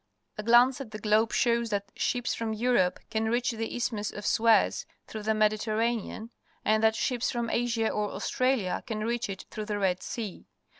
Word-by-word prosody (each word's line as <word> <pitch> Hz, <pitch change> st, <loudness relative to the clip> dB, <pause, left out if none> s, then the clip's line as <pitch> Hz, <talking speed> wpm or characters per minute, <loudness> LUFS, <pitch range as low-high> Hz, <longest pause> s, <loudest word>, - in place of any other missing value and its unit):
A -, -, -4 dB
glance 240 Hz, +4 st, +5 dB
at 255 Hz, -, -7 dB
the 215 Hz, -, -7 dB
globe 215 Hz, +1 st, +2 dB
shows 235 Hz, -1 st, +2 dB
that 200 Hz, -1 st, -3 dB
ships 245 Hz, -1 st, -1 dB
from 225 Hz, -1 st, -2 dB
Europe 220 Hz, -5 st, +2 dB
can 220 Hz, 0 st, 0 dB
reach 240 Hz, +2 st, +1 dB
the 225 Hz, -1 st, -4 dB
Isth 245 Hz, +1 st, -1 dB
nius 210 Hz, -2 st, -3 dB
of 205 Hz, -, -8 dB
Suez 225 Hz, 0 st, +3 dB, 0.2 s
through 215 Hz, -, -7 dB
the 220 Hz, +1 st, 0 dB
Mediterranean, 215 Hz, +1 st, 0 dB, 0.3 s
and 215 Hz, 0 st, +3 dB
that 220 Hz, 0 st, +4 dB
ships 245 Hz, +1 st, 0 dB
from 235 Hz, -2 st, -2 dB
Asia 230 Hz, -2 st, +1 dB
or 210 Hz, -1 st, -1 dB
Australia 255 Hz, -8 st, 0 dB
can 215 Hz, -2 st, -3 dB
reach 235 Hz, -2 st, -1 dB
it 195 Hz, -1 st, -6 dB
through 215 Hz, -, -5 dB
the 210 Hz, -1 st, -2 dB
Red 185 Hz, -2 st, 0 dB
Sea. 215 Hz, -6 st, -6 dB
220 Hz, 190 wpm, -28 LUFS, 210-235 Hz, 0.3 s, glance